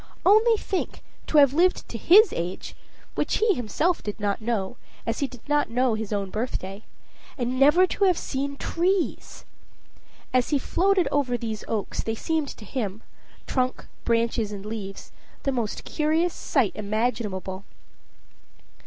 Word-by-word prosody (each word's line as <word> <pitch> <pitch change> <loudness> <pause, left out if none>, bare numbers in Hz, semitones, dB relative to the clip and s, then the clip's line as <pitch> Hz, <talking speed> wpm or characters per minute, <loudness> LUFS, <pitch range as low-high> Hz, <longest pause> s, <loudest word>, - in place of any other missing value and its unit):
Only 440 +4 +6
think, 385 -2 -3 0.2
to 310 - +2
have 280 -2 +7
lived 360 +4 +2
to - - -7
his 385 - +6
age 175 +2 -4 0.4
(which - - 0
he 440 -1 +3
himself 310 - 0
did 210 +1 -5
not 205 +1 -1
know, 220 0 -2 0.3
as 230 0 -2
he 280 - +1
did 250 -3 -14
not 295 0 +2
know 250 +1 +2
his 220 -1 -4
own 200 -2 -2
birthday) 210 -3 -4 0.5
and 250 0 -1
never 300 +7 +6
to 395 +2 0
have 365 -3 +3
seen 280 +1 -3
trees! 360 +4 -1 0.9
As 255 -1 +2
he 295 - +3
floated 370 +6 +2
over 255 -4 +1
these 220 -2 -4
oaks, 215 -3 -2
they 225 - -2
seemed 315 +4 -1
to 215 - -10
him 215 -4 -4 0.4
trunk, 255 -1 -1 0.2
branches, 230 -2 +1
and 200 -1 -7
leaves 210 -3 -6 0.3
the 275 - +1
most 235 -5 -2
curious 320 +3 +1
sight 255 -9 +1
imaginable. 210 -3 -2
245 Hz, 150 wpm, -25 LUFS, 215-315 Hz, 0.9 s, have